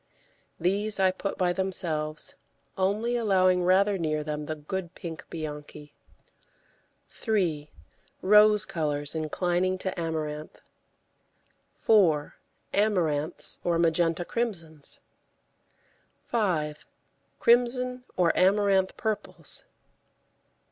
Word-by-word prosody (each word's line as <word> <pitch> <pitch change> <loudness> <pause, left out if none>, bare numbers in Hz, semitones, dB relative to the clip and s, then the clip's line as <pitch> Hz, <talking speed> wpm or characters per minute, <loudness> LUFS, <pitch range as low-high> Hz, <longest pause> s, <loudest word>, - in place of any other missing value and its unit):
These 200 +4 +1
I 190 -1 +4
put 195 +2 -4
by 180 -2 +1
themselves, 165 -5 -2 0.4
only 210 +6 0
allowing 185 -5 +3
rather 195 +2 +3
near 155 -2 -1
them 150 -1 -4
the 155 - -3
good 175 +4 -5
pink 165 -2 -8
Bianchi. 150 -2 -7 1.2
3. 170 -10 -1 0.5
Rose 210 +1 +6
colours 145 -3 -2
inclining 175 +4 0
to 185 -1 -4
amaranth. 155 -2 -4 1.2
4. 170 -9 +3 0.4
Amaranths 175 -7 0
or 170 -1 +1
magenta 165 +1 +2
crimsons. 165 -11 -2 1.3
5. 160 -10 -1 0.5
Crimson 250 +1 +3
or 175 -2 +3
amaranth 195 0 +3
purples. 215 -2 -3
180 Hz, 85 wpm, -27 LUFS, 155-200 Hz, 1.3 s, Rose